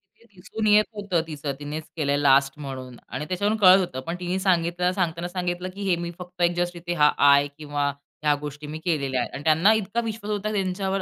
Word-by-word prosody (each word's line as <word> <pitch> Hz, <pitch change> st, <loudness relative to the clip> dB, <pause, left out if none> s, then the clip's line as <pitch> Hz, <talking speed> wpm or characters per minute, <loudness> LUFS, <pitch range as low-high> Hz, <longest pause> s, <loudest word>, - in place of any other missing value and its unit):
ते -, -, -26 dB
दिसून 205 Hz, +4 st, -4 dB
येत 210 Hz, 0 st, +6 dB
होतं 200 Hz, -5 st, -1 dB
तीचं, 150 Hz, -3 st, -4 dB
तिनेच 150 Hz, +2 st, -5 dB
केलंय 145 Hz, -2 st, +1 dB
लास्ट 135 Hz, -1 st, +4 dB
म्हणून 130 Hz, -3 st, -7 dB
आणि 135 Hz, +5 st, -5 dB
त्याच्यावरून 200 Hz, +5 st, 0 dB
कळत 190 Hz, -2 st, +7 dB
होतं. 175 Hz, -9 st, -3 dB
पण 170 Hz, -, -2 dB
तिने 180 Hz, +1 st, -2 dB
सांगताना 175 Hz, -1 st, 0 dB
सांगितलं 180 Hz, 0 st, -3 dB
की 200 Hz, -, -9 dB
"हे 180 Hz, -, +4 dB
मी 170 Hz, 0 st, -5 dB
फक्त 180 Hz, 0 st, -9 dB
एक 175 Hz, 0 st, +3 dB
जस्ट 175 Hz, 0 st, -1 dB
इथे 175 Hz, 0 st, -4 dB
हा 150 Hz, -, +7 dB, 0.2 s
आय." 140 Hz, 0 st, +6 dB
किंवा 145 Hz, -2 st, -2 dB
"ह्या 145 Hz, +1 st, -2 dB
गोष्टी 150 Hz, 0 st, -7 dB
मी 155 Hz, +1 st, -6 dB
केलेल्या 140 Hz, -7 st, 0 dB
आहेत." -, -, -4 dB
आणि 140 Hz, -, -6 dB
त्यांना 160 Hz, +7 st, +5 dB
इतका 220 Hz, +2 st, -1 dB
विश्वास 220 Hz, -1 st, -4 dB
होता 210 Hz, +1 st, -2 dB
त्यांच्यावर 195 Hz, 0 st, -1 dB
175 Hz, 205 wpm, -24 LUFS, 145-190 Hz, 0.2 s, कळत